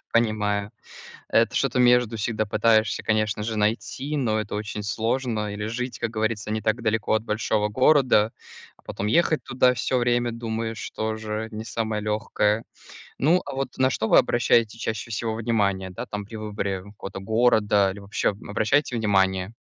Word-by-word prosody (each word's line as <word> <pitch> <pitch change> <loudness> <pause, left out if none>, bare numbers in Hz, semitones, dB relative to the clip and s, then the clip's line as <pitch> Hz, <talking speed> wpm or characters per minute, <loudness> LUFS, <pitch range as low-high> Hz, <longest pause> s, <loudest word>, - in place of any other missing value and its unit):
Понимаю. 105 -3 +1 0.6
Это 115 0 +2
что-то 130 -2 +1
между 125 -2 +4
всегда 110 0 -1
пытаешься, 110 +1 +2
конечно 110 -1 0
же, 110 0 -3
найти, 120 +7 -1
но 110 -5 +1
это 105 -1 -4
очень 105 0 -4
сложно 110 0 -1
или 105 0 -4
жить, 125 +3 -4
как 120 - -1
говорится, 110 -1 -2
не 110 - -1
так 110 +3 0
далеко 110 -1 0
от 110 0 +1
большого 105 -1 0
города, 125 -2 +4 0.5
а, - - -26
потом 100 - -5
ехать 160 +5 +2
туда 125 -1 +3
всё 125 +2 0
время, 120 0 +1
думаешь, 115 -1 -4
тоже 110 0 -3
не 110 +1 -6
самое 110 0 -2
легкое. 105 0 0 0.5
Ну, 165 +6 +3
а - - -5
вот, 135 0 -4
на 130 0 +3
что 110 -2 -1
вы - - +6
обращаете 115 -2 +2
чаще 110 0 -4
всего 110 +1 -2
внимание, 100 -5 0
да, 90 - -6
там 105 0 -5
при 110 +2 -9
выборе 100 -3 -3
какого-то 100 -1 -8
города 105 -2 +3
или 100 - -8
вообще 100 +1 -1
обращаете 110 +6 0
внимание? 95 -1 +1
110 Hz, 165 wpm, -24 LUFS, 105-120 Hz, 0.6 s, вы